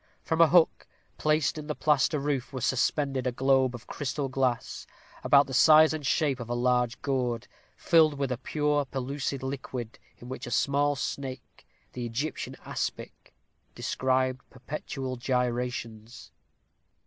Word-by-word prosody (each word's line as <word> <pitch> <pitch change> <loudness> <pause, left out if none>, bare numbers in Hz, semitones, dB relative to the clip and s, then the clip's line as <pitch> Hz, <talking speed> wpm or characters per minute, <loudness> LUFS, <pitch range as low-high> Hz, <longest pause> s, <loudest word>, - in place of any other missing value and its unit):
From 160 +1 +1
a 165 - +8
hook, 170 0 +3 0.3
placed 155 0 +1
in 150 - -8
the 150 - -3
plaster 150 0 +2
roof, 140 -3 -2
was 130 -4 -3
suspended 135 0 0
a - - +1
globe 130 0 +2
of 120 - -11
crystal 140 -1 -3
glass, 130 -2 -2 0.4
about 140 0 +5
the 135 - -8
size 155 +3 +7
and 155 -2 -4
shape 140 -1 +1
of 120 -1 -7
a 120 - -1
large 125 0 +1
gourd, 125 -5 -1 0.3
filled 160 -3 +4
with 140 -2 -2
a 125 - -1
pure 150 +2 0
pellucid 135 +1 -4
liquid, 130 -3 -5 0.2
in 120 - -12
which 130 -1 -6
a - - -5
small 145 +3 +1
snake, 130 -1 -6 0.3
the 125 - -5
Egyptian 125 +6 -4
aspic, - - -5 0.4
described 130 0 0
perpetual 130 -1 -6
gyrations. 120 -2 -3
130 Hz, 145 wpm, -28 LUFS, 125-145 Hz, 0.4 s, a